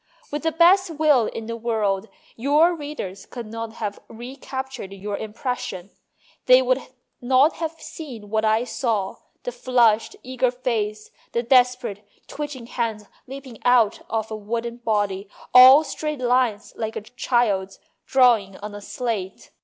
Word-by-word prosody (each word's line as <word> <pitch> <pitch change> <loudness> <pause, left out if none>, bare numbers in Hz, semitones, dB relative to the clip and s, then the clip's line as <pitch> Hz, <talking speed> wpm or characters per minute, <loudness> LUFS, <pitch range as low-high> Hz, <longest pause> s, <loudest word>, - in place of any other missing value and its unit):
With 295 0 -3
the 325 - 0
best 355 +3 +5
will 300 -7 +3
in 225 - -6
the 230 +1 -4
world, 220 -3 -1 0.3
your 295 +8 +3
readers 290 - -7
could 240 -2 -7
not 225 +1 -6
have 210 -3 -5
recaptured 260 -2 -7
your 200 +1 -5
impression. 215 -4 -5 0.6
They 255 0 +7
would 255 +1 +2 0.4
not 260 +5 +3
have 325 -1 -3
seen 235 -10 -9
what 220 0 +1
I 220 +1 +3
saw: 225 -5 -2 0.3
the 245 - -3
flushed, 240 -3 +2
eager 255 0 0
face, 220 -4 -3 0.2
the 235 - 0
desperate, 250 -4 +2 0.2
twitching 290 -5 -6
hands, 230 -3 -3 0.2
leaping 265 -3 -9
out 245 -4 +3
of 220 -1 -2
a - - -2
wooden 230 +3 -4
body, 205 -4 -1 0.2
all 260 +4 +10
straight 300 +1 -4
lines 245 -4 +1
like 220 0 -4
a - - -3
child's 215 -4 0 0.3
drawing 235 -8 +3
on 210 0 -8
a 205 - -8
slate. 205 -5 -4
235 Hz, 145 wpm, -23 LUFS, 215-260 Hz, 0.6 s, all